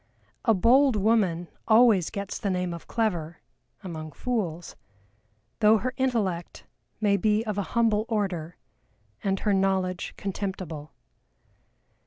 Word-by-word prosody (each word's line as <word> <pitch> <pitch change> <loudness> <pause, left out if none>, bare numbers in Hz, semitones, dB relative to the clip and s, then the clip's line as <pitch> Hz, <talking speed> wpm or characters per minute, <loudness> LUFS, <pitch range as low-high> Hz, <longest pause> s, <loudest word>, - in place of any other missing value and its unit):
"A 225 -3 +4
bold 255 +6 +4
woman 195 -5 +2 0.2
always 220 -6 +5
gets 200 -2 -5
the 205 - -2
name 180 -2 -1
of 170 - -9
clever" 175 -8 -1 0.5
among 155 -4 -7
fools 180 - -3 0.8
"though 215 +1 +6
her 255 +5 -3
intellect 210 -10 -1 0.4
may 205 -2 +3
be 210 +3 +2
of 210 -2 -2
a 200 +4 -4
humble 220 -2 +3
order, 185 -7 -2 0.7
and 195 -1 0
her 210 - +2
knowledge 190 -2 0
contemptible." 185 -6 -5
200 Hz, 120 wpm, -26 LUFS, 175-220 Hz, 0.8 s, though